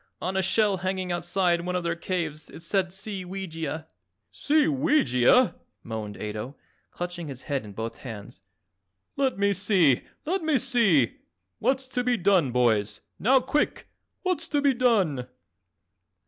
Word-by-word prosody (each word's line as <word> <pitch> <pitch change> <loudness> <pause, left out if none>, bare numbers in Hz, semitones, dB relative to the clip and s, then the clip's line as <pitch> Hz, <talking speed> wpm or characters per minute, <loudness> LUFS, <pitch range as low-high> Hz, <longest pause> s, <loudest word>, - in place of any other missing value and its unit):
On 185 +1 -3
a 190 - +2
shell 195 +1 +2
hanging 185 0 -2
outside 175 0 +1
of 170 - -6
one 180 - -1
of 180 - -1
their 170 0 -1
caves 170 -4 -3
it 165 - -11
said 190 +1 +1
'Seeweegia.'" 185 -4 -5 0.5
"Seeweegia!" 280 - +3 0.3
moaned 110 -2 -5
Ato, 105 +6 -5 0.3
clutching 175 -2 -5
his 135 -2 -8
head 140 -4 -2
in 105 -2 -10
both 115 +2 -5
hands. 110 -6 -9 0.7
"Let 270 -4 0
me 200 0 +2
see! 185 - +3 0.2
Let 365 +4 0
me 315 -3 +2
see! 220 - +2 0.4
What's 260 +3 0
to 250 -1 -1
be 245 -1 +2
done, 180 - +3
boys? 110 -4 +1 0.2
Now 260 +4 +4
quick! 270 +4 -1 0.3
What's 355 -4 0
to 295 - +1
be 280 -1 +3
done?" 195 - +2
185 Hz, 145 wpm, -26 LUFS, -, 0.7 s, Now